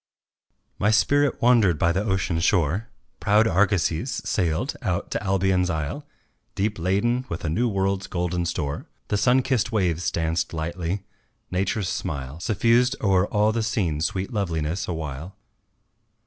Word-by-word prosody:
My 105 - +3
spirit 145 +6 +2
wandered 115 -9 +5
by 85 - +2
the 95 +4 0
ocean 95 -5 0
shore; 90 +4 +1 0.3
Proud 105 +2 +4
argosies 95 - +1 0.2
sailed 90 - 0
out 90 -8 -2
to - - -1
Albion's 95 -2 +1
isle 80 - -3 0.5
Deep 100 0 -1
laden 100 +9 +1
with 85 +1 -4
a - - 0
new 115 +10 +1
world's 95 -1 -1
golden 90 -1 -1
store, 75 -4 -3 0.2
The 105 - +1
sun 125 +5 +3
kissed 125 -4 0
waves 90 -5 +1
danced 80 0 -1
lightly, 85 +4 -3 0.5
Nature's 95 +1 -1
smile 70 -5 -4
Suffused 120 +5 +2
o'er 95 -1 +2
all 105 +1 +2
the 115 +1 -1
scene 100 - -1
sweet 95 +7 -2
loveliness 85 -4 -2
awhile. 80 +1 -5
95 Hz, 140 wpm, -24 LUFS, 85-110 Hz, 0.5 s, wandered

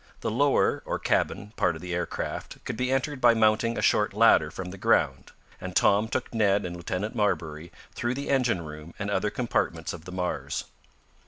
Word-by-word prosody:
The - - -1
lower, 140 +5 +2
or - - -2
cabin, 105 +2 -1
part - - +2
of 80 - -9
the 90 0 -4
aircraft 85 0 -4
could - - -3
be 125 +3 -1
entered 135 +1 -1
by 120 -1 +6
mounting 110 +1 +2
a - - -2
short 105 -1 +2
ladder 105 -8 +5
from 90 +3 -6
the 95 - -9
ground, 65 -6 +1 0.3
and 90 -1 -6
Tom 105 +2 +4
took 125 +2 -3
Ned 100 -3 +2
and 90 -1 -5
Lieutenant 90 +5 -3
Marbury 85 -7 -1 0.2
through 120 +1 -2
the 140 +1 -5
engine 120 - +1
room 75 +2 -10
and - - -3
other - - +1
compartments 80 0 -1
of 85 -1 -10
the 90 - -8
Mars. 90 -1 -3
100 Hz, 190 wpm, -27 LUFS, 85-115 Hz, 0.3 s, by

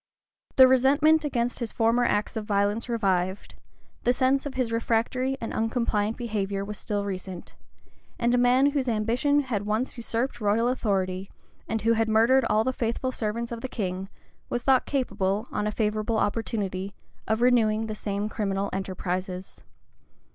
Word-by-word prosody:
The 260 -1 +9
resentment 285 +5 +4
against 245 -4 -1
his 235 -3 -3
former 230 +1 +2
acts 210 -3 0
of 220 - -2
violence 205 +3 0
revived; 190 -4 -1 0.5
the 245 - +4
sense 265 +3 +1
of 275 - -8
his 255 -3 -1
refractory 235 +3 0
and 230 - -5
uncompliant 225 -2 0
behavior 200 -4 -2
was 210 0 -7
still 205 -1 -2
recent; 185 -2 -6 0.6
and 235 0 +1
a - - +4
man 255 +3 +4
whose 275 -3 -1
ambition 240 +6 +2
had 215 -7 -3
once 220 +5 -1
usurped 235 +1 -2
royal 215 +3 +2
authority, 195 -6 -1 0.4
and 225 -2 -2
who 230 +1 +4
had 225 0 +1
murdered 230 +4 +4
all 215 -1 +2
the 260 - -1
faithful 240 +2 -2
servants 230 0 -3
of 230 -1 -5
the 260 - -3
king, 190 -4 -3 0.4
was 240 - -2
thought 265 -1 +3
capable, 215 -5 -1
on 210 0 -1
a - - 0
favorable 215 +1 -1
opportunity, 200 -3 -2 0.3
of 220 +2 +1
renewing 225 -3 +3
the 215 - -4
same 205 -1 -3
criminal 200 -2 -2
enterprises. 185 -1 -4
225 Hz, 160 wpm, -26 LUFS, 205-245 Hz, 0.6 s, The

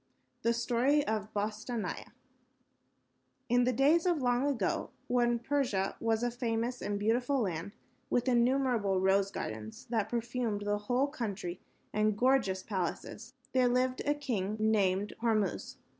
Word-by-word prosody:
] - - -45
The 235 - +2
Story 245 +5 +2
of 215 -1 -2
Bostanai 215 +2 -3 1.4
In 245 +1 +4
the 250 - +3
days 295 +8 +3
of 350 -2 +3
long 245 +1 +2
ago, 235 -10 -1 0.2
when 240 -1 +2
Persia 235 -6 0
was 225 0 +1
a 245 - +1
famous 240 0 -2
and 205 0 -2
beautiful 245 +6 +1
land, 185 -1 -3 0.4
with 245 +1 +1
innumerable 240 -5 +2
rose 190 +1 +3
gardens 110 - -6
that 220 -3 0
perfumed 235 -2 -2
the 205 0 0
whole 250 +3 +3
country 210 - -4 0.3
and 215 -1 +2
gorgeous 235 -7 +2
palaces, 210 +5 -4 0.2
there 255 -1 +4
lived 255 +1 +1
a 290 - +3
king, 215 -8 -2
named 205 -2 +2
Hormuz. 220 -3 0
230 Hz, 140 wpm, -32 LUFS, 205-250 Hz, 1.4 s, In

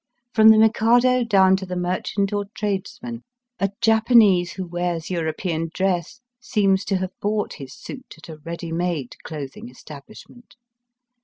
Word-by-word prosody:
From 220 0 +7
the 220 - +7
Mikado 240 +3 +4
down 190 -4 +4
to 190 - -7
the 180 - -4
merchant 185 +3 -2
or 205 0 -1
tradesman, 230 +4 -4 0.4
a 195 - +1
Japanese 220 -6 +4
who 190 0 -5
wears 175 -1 -3
European 165 0 -2
dress 190 +4 -1 0.2
seems 200 -5 +1
to 195 - 0
have 185 0 -3
bought 210 0 -1
his 135 -2 -10
suit 260 -1 -10
at 160 - -14
a 160 -2 -9
ready 165 +2 -7
made 165 -6 -2
clothing 140 -5 -7
establishment. 155 - -14
190 Hz, 145 wpm, -22 LUFS, 170-220 Hz, 0.4 s, From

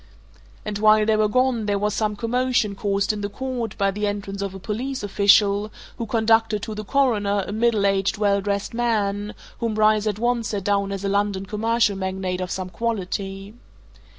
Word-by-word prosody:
And 210 -1 -3
while 215 0 +5
they 220 0 +3
were 215 0 +3
gone 250 -1 +1
there 205 -1 +1
was 210 +1 0
some 210 -1 -1
commotion 235 -1 0
caused 200 +1 0
in 210 - -5
the 205 - -3
court 245 -1 -4
by 200 -1 +2
the 210 +1 -2
entrance 200 -1 -4
of 195 -1 -4
a - - -7
police 245 +7 -4
official 205 +1 +3 0.3
who 230 - -3
conducted 225 -2 +2
to 220 - -4
the 215 0 -5
Coroner 205 -6 +1
a - - -6
middle 220 -1 +1
aged, 195 0 +1
well 200 -1 +2
dressed 200 +1 -2
man 210 -3 -1 0.2
whom 230 -2 -1
Bryce 215 0 +3
at 205 -2 -1
once 240 0 0
set 200 -3 -3
down 200 0 0
as 195 0 -4
a - - 0
London 200 -1 0
commercial 220 +1 +1
magnate 190 -1 -3
of 180 - -3
some 185 0 -4
quality. 195 -1 -3
210 Hz, 190 wpm, -23 LUFS, 200-225 Hz, 0.3 s, while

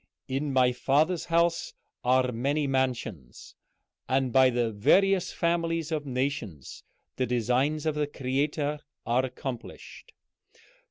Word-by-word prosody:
"'In 140 +2 -2
my 130 -2 +4
Father's 150 +7 +1
house 170 0 +1 0.3
are 125 0 +3
many 140 +6 0
mansions,' 125 - -3 0.6
and 130 -2 +1
by 130 -1 +6
the 120 -2 0
various 185 - +3
families 165 -1 -1
of 150 -2 -2
nations 125 - -4 0.3
the 130 - 0
designs 125 +6 0
of 155 - +1
the 150 0 -1
Creator 145 +2 -1 0.3
are 125 +2 +2
accomplished. 130 -1 -7
135 Hz, 115 wpm, -28 LUFS, 125-150 Hz, 0.6 s, by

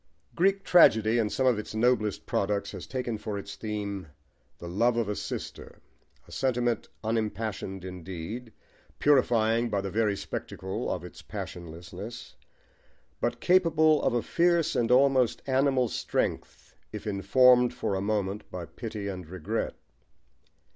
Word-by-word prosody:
Greek 195 +3 +2
tragedy 120 - +5
in 110 -2 +1
some 130 - 0
of 125 -4 +3
its 105 - -7
noblest 110 -2 +1
products 100 0 -1
has - - -8
taken 125 -4 -3
for 105 -1 -4
its 100 0 -7
theme 100 -4 -4 0.5
the 85 - -8
love 115 +7 +2
of 115 -3 +1
a 105 - -2
sister, - - -6 0.5
a - - -16
sentiment 120 -3 0
unimpassioned 110 -4 -2
indeed, 95 +6 -7 0.5
purifying 120 -4 +3
by 100 -2 0
the 100 -1 -4
very 105 -1 +1
spectacle 95 0 -5
of - - -3
its - - -10
passionlessness, 90 +7 -8 0.8
but - - -1
capable 160 -4 +4
of - - +1
a 120 - +1
fierce 170 -1 +2
and 115 -1 +1
almost 130 -1 +4
animal 135 -1 +2
strength - - -3 0.2
if - - -7
informed 125 +5 +5
for 105 - -3
a 95 - -1
moment 100 -1 -2
by 90 -2 -6
pity 105 +5 -6
and 90 -4 -6
regret. 100 +5 -3
110 Hz, 140 wpm, -28 LUFS, 100-125 Hz, 0.8 s, tragedy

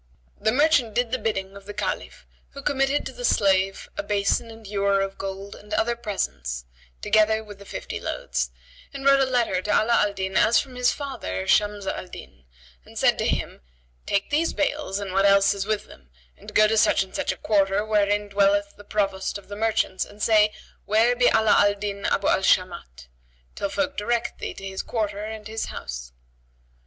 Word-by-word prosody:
The 220 - +2
merchant 255 -4 +3
did 245 -1 +1
the 255 - 0
bidding 195 -3 -2
of 200 0 -12
the 205 - -7
Caliph - - -4 0.3
who 280 - -9
committed 275 0 +1
to - - -5
the - - -8
slave 195 - +2
a - - -2
basin 205 +3 0
and 225 -1 -12
ewer 200 -1 +1
of 195 0 -3
gold 195 +1 -6
and 210 +1 -15
other 235 +1 +1
presents, 60 - -4 0.4
together 220 0 +3
with 205 -2 -12
the 200 - -13
fifty - - -6
loads; - - -2 0.5
and 275 0 -6
wrote 275 0 +6
a 265 -1 +2
letter 235 -7 +1
to 205 - -7
Ala 220 +3 +3
al 205 -1 0
Din 190 -1 -4
as 230 - +5
from 270 -2 -6
his 250 -1 +2
father 240 - -5
Shams 205 -1 +2
al 185 - -4
Din 65 - -12 0.4
and - - -14
said - - +3
to - - +1
him, - - -2 0.5
"Take 200 +5 0
these 320 +3 +1
bales 295 -8 -1
and 200 -2 -5
what 195 +1 +4
else 200 0 +5
is 200 0 -4
with 215 -1 -1
them, 65 -2 -17 0.3
and - - -13
go 215 0 +6
to 220 +1 +1
such - - +4
and 190 - -15
such - - -1
a - - -6
quarter 200 0 +1
wherein 205 -1 +1
dwelleth 200 0 +2
the 205 - -12
Provost 195 -2 -1
of 200 - -15
the 205 - -6
merchants 220 -3 0
and 205 - -13
say, 210 -1 +4 0.3
'Where 225 +4 +3
be 245 0 +4
Ala 220 -1 +4
al 205 0 +4
Din 200 -1 -4
Abu 195 - +1
al - - +3
Shamat?' 170 - 0 0.5
till 200 - -3
folk 285 +6 -2
direct 235 +3 -1
thee - - -5
to 195 - -9
his 190 0 -4
quarter 210 -3 -3
and 215 -1 -6
his 220 +1 -3
house." - - -7
205 Hz, 200 wpm, -24 LUFS, 195-225 Hz, 0.5 s, wrote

